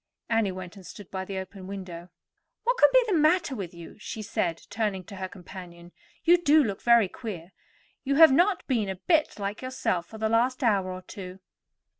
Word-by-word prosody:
Annie 225 -4 +2
went 185 0 -8
and 195 - -12
stood 195 +1 -11
by 190 -1 -4
the 195 0 -5
open 190 0 -7
window. 185 -3 -7 0.5
"What - - +1
can - - +7
be - - +6
the 430 - -1
matter 315 0 +3
with 190 -6 -5
you?" 170 +3 -12
she 215 +1 -6
said, 170 -4 -2
turning 205 -3 -1
to 200 +2 -11
her 190 0 -4
companion. 175 -2 -11 0.3
"You 345 +1 +6
do 310 -2 +5
look 200 -6 -3
very 235 -3 +5
queer. 185 -4 -8 0.5
You 275 +1 0
have 320 -1 +8
not 355 +7 +3
been 225 -7 0
a 190 - -3
bit 310 - +1
like 200 +1 -4
yourself 255 -9 -2
for 220 - -10
the 220 0 0
last 245 +4 +1
hour 195 -5 +2
or 185 0 -7
two." 185 0 -9
205 Hz, 200 wpm, -27 LUFS, 185-255 Hz, 0.5 s, have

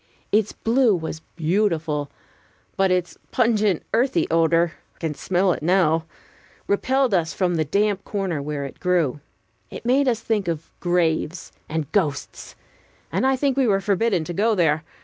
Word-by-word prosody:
Its 215 0 +2
blue 230 -2 +2
was 160 -2 -5 0.2
beautiful, 160 -4 0 0.7
but 195 0 +2
its 180 -1 -1
pungent 215 -7 +2
earthy 230 - +2
odor 165 0 +3 0.2
I - - -32
can 160 -3 -3
smell 185 +4 +1
it - - -6
now 165 -1 +2 0.6
repelled 260 +4 +1
us 165 -3 +1
from 180 -2 +1
the 160 -2 0
damp 200 +4 +1
corner 190 -7 -2
where 145 -1 -4
it 135 - -9
grew. 170 -7 +1 0.5
It - - -9
made 265 +3 +3
us 235 -3 +2
think 215 -4 -1
of 165 -2 -4
graves 175 -1 0 0.2
and 155 -2 -3
ghosts; 155 -9 -2 0.6
and 265 - +1
I 265 - +3
think 270 0 0
we 270 -2 +2
were 195 -2 +3
forbidden 200 -2 +1
to 175 - -5
go 215 +5 +2
there. 160 -4 +2
180 Hz, 160 wpm, -23 LUFS, 160-215 Hz, 0.7 s, odor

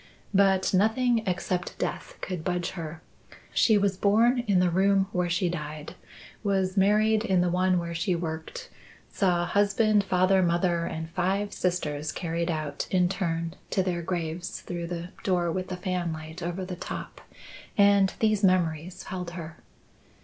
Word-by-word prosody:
But 195 -1 +3
nothing 225 +4 +3
except 180 0 -2
death - - -4
could 180 -4 -4
budge 180 -1 -1
her. 160 -2 -7 0.5
She 220 -3 +4
was 200 -2 +1
born 230 +6 +4
in 195 -3 +4
the 180 -1 +3
room 195 +2 +3
where 180 -2 0
she 180 +2 +1
died; 155 -3 -5 0.5
was 190 -2 0
married 210 +2 +3
in 190 -5 +2
the 175 -1 +1
one 185 +1 +2
where 170 -1 -3
she 175 +2 0
worked; 160 -2 -5 0.4
saw 175 -3 +1
husband, 205 +2 +3
father, 190 0 +3
mother, 170 -1 +1
and 160 0 -5
five 195 +3 -1
sisters 155 -4 -1
carried 170 0 -2
out 155 -3 -3
in 180 -1 +3
turn 165 -3 -2 0.2
to 190 - +1
their 175 -2 -1
graves 170 0 -4
through 170 -1 -5
the 175 0 -5
door 180 -5 +1
with 185 +2 -3
the 180 - -5
fanlight 170 -3 -4
over 175 +2 -3
the 180 -1 -5
top - - -7 0.6
and 200 -1 +5
these 215 -2 +2
memories 180 -1 +1
held 180 -2 -5
her." 165 -1 -7
180 Hz, 155 wpm, -27 LUFS, 170-195 Hz, 0.6 s, and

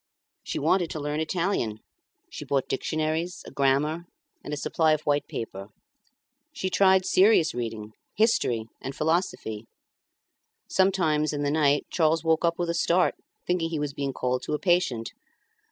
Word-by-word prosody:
She - - -5
wanted 180 -3 +2
to 155 - -5
learn 150 +1 -2
Italian; 160 - -1 0.5
she - - -7
bought 135 -2 0
dictionaries, 155 +5 -2
a - - -10
grammar, 140 +5 +1 0.4
and - - -7
a 150 - -2
supply 160 +2 +2
of 155 - -1
white 145 -1 0
paper. 100 -3 -6 0.9
She 190 -10 -2
tried 190 0 +4
serious 190 -4 +4
reading, 110 -3 -5 0.2
history, 125 - +2 0.2
and 135 0 -6
philosophy. 155 - -1 1.0
Sometimes 165 -6 +2
in 145 0 -2
the 145 - +1
night 145 -2 +2
Charles 165 -1 +2
woke 160 0 +2
up 170 0 +1
with 175 -1 -1
a - - -2
start, 175 +1 +2 0.3
thinking 180 -2 0
he 165 - -2
was 145 -1 -3
being 140 -1 -2
called 125 -1 -1
to - - -3
a 150 - 0
patient. 175 -11 +1
155 Hz, 155 wpm, -26 LUFS, 140-175 Hz, 1.0 s, tried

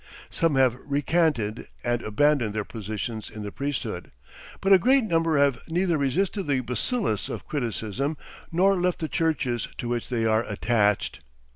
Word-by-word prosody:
Some 165 -4 +1
have 130 -2 +3
recanted 145 -6 0 0.2
and 120 0 0
abandoned 120 -1 +2
their 105 - 0
positions 110 0 -5
in 110 - -8
the 100 - -5
priesthood. 120 -10 -4 0.5
But 195 0 +4
a 190 - +8
great 265 +6 +4
number 165 -6 +2
have 140 -4 +3
neither 175 +1 +1
resisted 175 - 0
the 135 -3 +2
bacillus 125 - -1
of - - -5
criticism 130 +2 -2 0.3
nor 185 +2 +3
left 180 0 +1
the 160 - -3
churches 135 -8 0
to 120 - -4
which 120 -1 -2
they 115 -3 0
are 110 +1 +3
attached. 105 - +1
135 Hz, 155 wpm, -26 LUFS, 115-165 Hz, 0.5 s, a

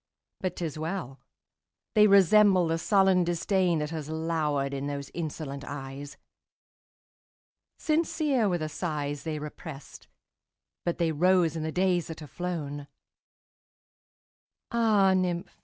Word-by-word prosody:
But 185 - -3
't 175 - -3
is 155 -1 -5
well!—they 170 - -2
resemble 200 -1 +6
the 165 0 0
sullen 190 -1 +3
disdainThat 175 -2 0
has 155 -2 -5
lowered 155 -4 -1
in 140 +1 -3
those 140 -1 -5
insolent 150 -4 -5
eyes. 140 0 -7 1.6
Sincere 305 -7 +1
were 175 - +1
the 155 -2 -3
sighs 145 -3 -3
they 155 +1 -4
represt, 150 -1 -9 0.8
But 175 - -1
they 170 -2 +1
rose 175 0 +3
in 160 - -3
the 160 0 -2
days 180 -1 +1
that 160 -1 -8
are - - -7
flown! 145 -3 -5 1.8
Ah, 215 -5 +4
nymph! 180 -2 -1
165 Hz, 120 wpm, -28 LUFS, 150-185 Hz, 1.8 s, resemble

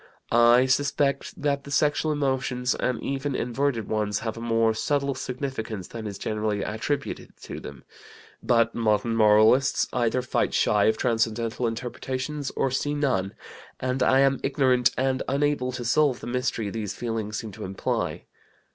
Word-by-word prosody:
I 120 +2 +6
suspect 140 +1 0
that 140 -1 0
the 140 - -10
sexual 150 +2 +1
emotions 130 -3 0
and 125 -2 -1
even 140 0 -2
inverted 125 -2 -1
ones 105 -1 -1
have 110 -1 -3
a 115 - -8
more 115 -1 +2
subtle 140 +4 0
significance 125 -7 -5
than 115 -2 -6
is 100 -2 -6
generally 105 -1 -2
attributed 110 +7 -4
to - - -7
them; - - -10 0.6
but 115 -1 +2
modern 115 0 +1
moralists 110 +5 +4
either 125 0 +1
fight 130 - 0
shy 105 -1 +3
of 110 0 +3
transcendental 115 0 0
interpretations 130 +4 -4
or 135 - 0
see 145 +3 -1
none, 125 -10 0 0.4
and 130 +1 -2
I 130 +1 +4
am 135 0 +3
ignorant 130 -3 +3
and 130 0 +1
unable 140 -2 0
to 120 -1 -5
solve 135 +1 +2
the - - -9
mystery 120 -4 -2
these 105 -2 -4
feelings 110 -3 -3
seem 110 -2 -6
to - - -9
imply. 95 +1 -3
125 Hz, 155 wpm, -25 LUFS, 110-135 Hz, 0.6 s, I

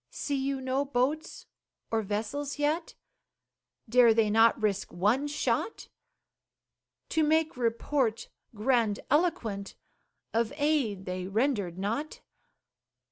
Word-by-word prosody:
See 285 - -3
you 270 0 -1
no 260 +2 0
boats 285 +3 -2 0.5
or 225 -1 +1
vessels 225 +9 -3
yet? 305 +3 -1 0.9
Dare 235 -1 +5
they 220 -2 +3
not 225 +2 +5
risk 205 -3 -1
one 215 +11 +1
shot, 295 +8 -2 1.2
To 320 - +1
make 315 +1 +2
report 235 0 0 0.3
grandiloquent 230 - 0 0.6
Of 230 +3 0
aid 280 -11 0
they 185 0 -4
rendered 205 -5 0
not? 225 +11 -3
245 Hz, 100 wpm, -29 LUFS, 215-290 Hz, 1.2 s, Dare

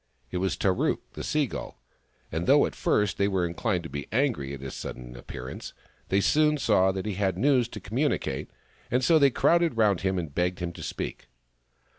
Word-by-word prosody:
It - - -2
was 95 +1 -1
Tarook, 95 -2 +1
the - - -6
Sea 150 -1 +1
Gull, - - -7 0.5
and 80 +3 -2
though - - +6
at - - -4
first 105 -2 +1
they 100 - +3
were 95 -3 +1
inchned 90 +1 -1
to 80 - -7
be 70 0 -5
angry 115 - 0
at 70 - -6
his 65 -1 -6
sudden - - -7
appearance, 65 +1 -8 0.4
they 100 +1 +3
soon 150 +6 +3
saw 95 -8 +3
that 95 +1 -4
he 105 - -2
had 95 -1 0
news 130 +1 +3
to 110 - -8
communicate, 105 - -1 0.4
and 125 +2 +1
so 160 +5 +5
they 140 -1 +6
crowded 170 +1 +2
round 105 -5 +3
him 95 0 0
and 80 -5 -4
begged 90 +3 0
him 85 -2 -4
to - - -10
speak. - - -5
95 Hz, 200 wpm, -27 LUFS, 85-120 Hz, 0.5 s, though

